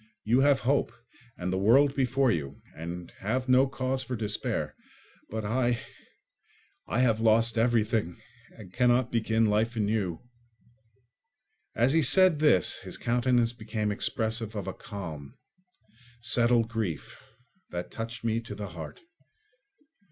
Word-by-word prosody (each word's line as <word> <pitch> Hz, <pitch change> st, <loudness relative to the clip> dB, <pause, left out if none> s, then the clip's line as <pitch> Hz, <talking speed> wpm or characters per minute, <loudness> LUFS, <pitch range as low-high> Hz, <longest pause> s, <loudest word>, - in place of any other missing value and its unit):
You 120 Hz, +4 st, +3 dB
have 140 Hz, 0 st, +4 dB
hope, 140 Hz, +3 st, +1 dB, 0.5 s
and 90 Hz, +1 st, -3 dB
the 95 Hz, -, 0 dB
world 135 Hz, +8 st, +4 dB
before 130 Hz, -1 st, +2 dB
you, 70 Hz, -7 st, -3 dB, 0.2 s
and 85 Hz, +2 st, -7 dB
have 125 Hz, +6 st, -2 dB
no 130 Hz, +1 st, +5 dB
cause 130 Hz, 0 st, -2 dB
for 125 Hz, -, -4 dB
despair. 105 Hz, -2 st, -2 dB, 0.6 s
But 110 Hz, -1 st, -4 dB
I—I 120 Hz, 0 st, -5 dB
have 115 Hz, -4 st, +2 dB
lost 115 Hz, +1 st, +3 dB
everything 110 Hz, -5 st, +1 dB, 0.4 s
and 95 Hz, -4 st, -12 dB
cannot 125 Hz, +1 st, +2 dB
begin 115 Hz, -1 st, +1 dB
life 110 Hz, +3 st, +1 dB
anew." 105 Hz, -5 st, -1 dB, 1.5 s
As 120 Hz, +4 st, +3 dB
he 165 Hz, -, +4 dB
said 165 Hz, +3 st, +4 dB
this 150 Hz, -, +3 dB
his -, -, -7 dB
countenance 120 Hz, 0 st, +1 dB
became 110 Hz, -2 st, -3 dB
expressive 110 Hz, +1 st, -2 dB
of 100 Hz, -4 st, -4 dB
a -, -, -4 dB
calm, 80 Hz, -8 st, -8 dB, 0.8 s
settled 120 Hz, 0 st, +3 dB
grief 110 Hz, -10 st, -4 dB, 0.5 s
that 90 Hz, 0 st, -5 dB
touched 115 Hz, +1 st, -6 dB
me 115 Hz, 0 st, 0 dB
to 115 Hz, -3 st, -8 dB
the 100 Hz, -1 st, -6 dB
heart. 85 Hz, -2 st, -9 dB
115 Hz, 130 wpm, -28 LUFS, 105-125 Hz, 1.5 s, no